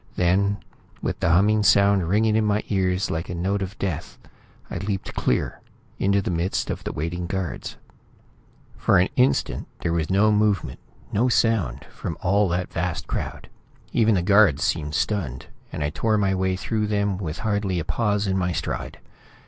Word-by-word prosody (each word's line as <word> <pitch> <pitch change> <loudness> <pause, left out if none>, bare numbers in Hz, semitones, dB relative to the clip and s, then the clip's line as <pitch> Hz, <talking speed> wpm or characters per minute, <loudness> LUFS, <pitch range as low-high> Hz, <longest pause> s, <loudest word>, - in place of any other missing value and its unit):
Then, 100 +3 +2 0.5
with - - -2
the - - +1
humming 105 +6 +4
sound 100 -3 +4
ringing 110 +2 +3
in 110 - +3
my 105 0 +1
ears 95 -1 0
like 80 +2 -3
a 90 - -3
note 95 +4 -1
of 95 +2 -5
death, 95 -7 -4 0.5
I - - -3
leaped 95 0 -3
clear, - - -1 0.4
into 100 0 +2
the - - -2
midst 85 +2 -1
of - - -5
the - - -3
waiting 85 +3 -3
guards. 95 -7 -4 1.0
For - - +3
an 90 +2 +3
instant, 125 +1 +1
there 85 - 0
was 80 -2 -1
no 100 +3 +4
movement, 105 -1 +1 0.3
no 120 +5 +3
sound, 105 - +1
from - - -5
all 100 +1 +2
that 90 0 -2
vast - - -2
crowd. - - -4 0.5
Even 110 -2 +4
the 90 - +1
guards 100 -6 +5
seemed 75 -3 -1
stunned, 80 - -1 0.3
and 75 - -3
I 75 - -1
tore 110 +6 +1
my 100 -2 +2
way 95 0 0
through 105 +3 -1
them 100 -2 0
with 80 -5 -4
hardly 100 -3 0
a 85 - -2
pause 105 -3 0
in 95 -1 0
my 90 -1 0
stride. - - -4
95 Hz, 175 wpm, -24 LUFS, 85-105 Hz, 1.0 s, guards